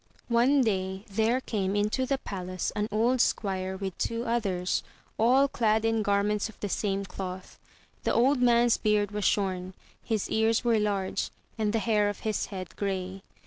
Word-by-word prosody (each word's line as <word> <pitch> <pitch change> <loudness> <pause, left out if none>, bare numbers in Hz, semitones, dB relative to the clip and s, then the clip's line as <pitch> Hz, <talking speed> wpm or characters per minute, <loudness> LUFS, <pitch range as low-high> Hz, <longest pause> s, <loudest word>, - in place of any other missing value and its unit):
One 250 +4 +4
day 190 -3 -1
there 225 +4 +1
came 200 -6 -2
into 210 +6 0
the 275 - +1
palace 185 -6 -4
an 210 0 0
old 235 +4 +2
squire 190 -2 -1
with 190 -2 -4
two 230 0 -1
others, 195 -6 0 0.4
all 255 +5 +5
clad 220 -4 +1
in 225 -1 +2
garments 205 +1 +1
of 220 - -15
the 205 - -3
same 195 0 -1
cloth. 185 -1 -7 0.4
The - - 0
old 255 +2 +3
man's 240 -1 +4
beard 210 -2 +1
was 210 -2 -2
shorn, 185 -2 0 0.3
his 220 -3 -1
ears 220 +1 +2
were 230 -2 +3
large, 200 -2 -1 0.3
and 215 -2 0
the 225 - +1
hair 210 -2 +2
of 205 - -6
his 215 -2 -1
head 185 -4 -7
grey. 190 -1 -3
210 Hz, 170 wpm, -28 LUFS, 195-230 Hz, 0.4 s, all